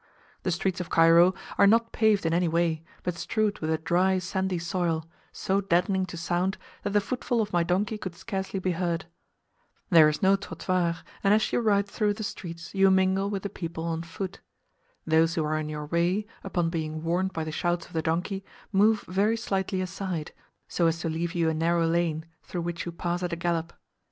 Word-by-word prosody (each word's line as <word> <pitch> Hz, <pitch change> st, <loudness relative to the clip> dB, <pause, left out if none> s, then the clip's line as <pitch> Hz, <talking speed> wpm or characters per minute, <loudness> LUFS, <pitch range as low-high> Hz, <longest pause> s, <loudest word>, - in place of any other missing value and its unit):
The -, -, -1 dB
streets 180 Hz, +2 st, -1 dB
of 180 Hz, -, -6 dB
Cairo 165 Hz, +3 st, +6 dB, 0.2 s
are 200 Hz, -, +7 dB
not 230 Hz, +2 st, +4 dB
paved 215 Hz, -4 st, +2 dB
in 165 Hz, -, +2 dB
any 175 Hz, +1 st, +2 dB
way, 165 Hz, -1 st, +1 dB, 0.2 s
but 180 Hz, -, -1 dB
strewed 210 Hz, +4 st, -1 dB
with 155 Hz, -, -2 dB
a 160 Hz, -, +2 dB
dry 180 Hz, +4 st, +2 dB
sandy 185 Hz, 0 st, -1 dB
soil, 170 Hz, -2 st, -1 dB, 0.3 s
so 195 Hz, +1 st, 0 dB
deadening 185 Hz, +1 st, +1 dB
to 170 Hz, -, -7 dB
sound, 175 Hz, +3 st, 0 dB, 0.2 s
that 205 Hz, -, -3 dB
the 205 Hz, -, +5 dB
footfall 245 Hz, +2 st, -1 dB
of 210 Hz, -3 st, -1 dB
my 175 Hz, -, +3 dB
donkey 195 Hz, +6 st, 0 dB
could 185 Hz, -4 st, -6 dB
scarcely 195 Hz, 0 st, -4 dB
be 185 Hz, 0 st, 0 dB
heard. 170 Hz, -1 st, -1 dB, 0.9 s
There 160 Hz, -3 st, +8 dB
is 150 Hz, +3 st, -3 dB
no 190 Hz, +1 st, +6 dB
trottoir, 185 Hz, -3 st, -1 dB, 0.3 s
and 200 Hz, +1 st, +5 dB
as 215 Hz, -, 0 dB
you -, -, +3 dB
ride 205 Hz, -3 st, +3 dB
through 205 Hz, 0 st, 0 dB
the 220 Hz, -, -5 dB
streets 170 Hz, -4 st, -7 dB
you 195 Hz, 0 st, +5 dB
mingle 190 Hz, +1 st, +3 dB
with 200 Hz, -2 st, -3 dB
the 200 Hz, -, -2 dB
people 165 Hz, -4 st, -5 dB
on 165 Hz, -1 st, -2 dB
foot. 185 Hz, +3 st, -6 dB, 0.7 s
Those 160 Hz, +1 st, +3 dB
who 160 Hz, -, 0 dB
are 155 Hz, +1 st, 0 dB
in 155 Hz, 0 st, -4 dB
your 150 Hz, -1 st, -4 dB
way, 175 Hz, +6 st, +1 dB, 0.2 s
upon 170 Hz, -3 st, -1 dB
being 155 Hz, -1 st, -3 dB
warned 180 Hz, +3 st, 0 dB
by 165 Hz, -4 st, -3 dB
the 155 Hz, -, -4 dB
shouts 175 Hz, +2 st, -1 dB
of -, -, -17 dB
the 160 Hz, -, 0 dB
donkey 170 Hz, +5 st, -1 dB
boy, 195 Hz, -, -25 dB, 0.3 s
move 210 Hz, +2 st, +4 dB
very 205 Hz, +5 st, +1 dB
slightly 190 Hz, -3 st, -1 dB
aside, 185 Hz, -3 st, -4 dB, 0.4 s
so 170 Hz, -, +1 dB
as 165 Hz, 0 st, +1 dB
to 165 Hz, -, -1 dB
leave 165 Hz, +2 st, -2 dB
you 170 Hz, -2 st, +2 dB
a 160 Hz, -, +2 dB
narrow 165 Hz, +1 st, +2 dB
lane, 165 Hz, -1 st, 0 dB, 0.2 s
through 175 Hz, -, -5 dB
which 170 Hz, 0 st, -4 dB
you -, -, -3 dB
pass 175 Hz, +1 st, -2 dB
at 175 Hz, -1 st, -2 dB
a -, -, +1 dB
gallop. 170 Hz, -1 st, -1 dB
175 Hz, 210 wpm, -27 LUFS, 165-195 Hz, 0.9 s, There